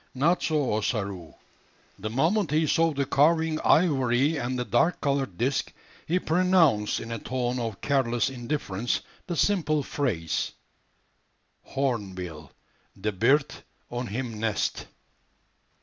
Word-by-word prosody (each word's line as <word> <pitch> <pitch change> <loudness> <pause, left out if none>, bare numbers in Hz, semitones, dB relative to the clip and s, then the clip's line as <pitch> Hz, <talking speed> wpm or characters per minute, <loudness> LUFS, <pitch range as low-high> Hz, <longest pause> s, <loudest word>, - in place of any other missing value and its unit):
Not 160 +7 +2
so 150 -7 +1
Ossaroo. 100 -6 -2 0.6
The 110 +3 -4
moment 165 - +1
he 155 +2 +2
saw 165 +2 +3
the 140 -2 -1
carving 160 +3 +3
ivory 140 -3 +3
and 130 -2 -2
the 125 - -2
dark 120 +10 +2
coloured 135 -9 -1
disc, 135 +3 0 0.4
he 175 - +2
pronounced, 165 - +3
in 115 - -7
a 115 - -3
tone 125 +1 -2
of 115 -4 -4
careless 120 -5 +1
indifference, 120 -4 -2 0.3
the 175 - -2
simple 155 -5 +2
phrase, 100 - -2 1.1
"Hornbill 95 - -3 0.5
de 105 +2 -1
bird 135 +9 +2 0.4
on 120 0 -3
him 115 0 -4
nest." 110 -1 -1
130 Hz, 120 wpm, -27 LUFS, 115-155 Hz, 1.1 s, saw